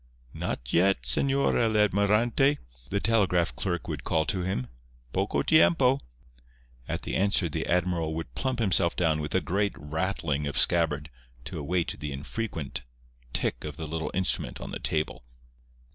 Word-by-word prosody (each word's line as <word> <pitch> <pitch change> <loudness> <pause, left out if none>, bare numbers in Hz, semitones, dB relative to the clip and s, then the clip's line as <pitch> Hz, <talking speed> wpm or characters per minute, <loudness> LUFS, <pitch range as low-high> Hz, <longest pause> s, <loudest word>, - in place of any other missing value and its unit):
"Not - - -4
yet, 95 -6 +3
Señor 135 - +2
el 110 -2 +2
Almirante," 105 +7 +3 0.3
the 100 - 0
telegraph 95 -6 +2
clerk 90 -3 -2
would - - -4
call 80 -1 +1
to 95 - -1
him—"poco - - -3
tiempo!" 140 -4 +5 0.9
At - - -3
the - - -3
answer 100 -2 +2
the 80 +1 -3
admiral 85 -3 0
would 80 -7 -5
plump 130 - -2
himself 95 -6 +3
down 80 -3 +2
with 75 +3 -3
a 95 - +3
great 100 +6 0
rattling 75 -2 -2
of 70 - -3
scabbard 75 -3 +2 0.3
to - - -5
await 85 +4 -1
the 75 - -4
infrequent 75 +2 -4 0.5
tick - - -1
of 75 -1 -6
the 80 - -5
little 80 +1 -3
instrument 95 0 0
on - - -7
the - - -4
table. 75 -5 -2
85 Hz, 150 wpm, -28 LUFS, 75-100 Hz, 0.9 s, tiempo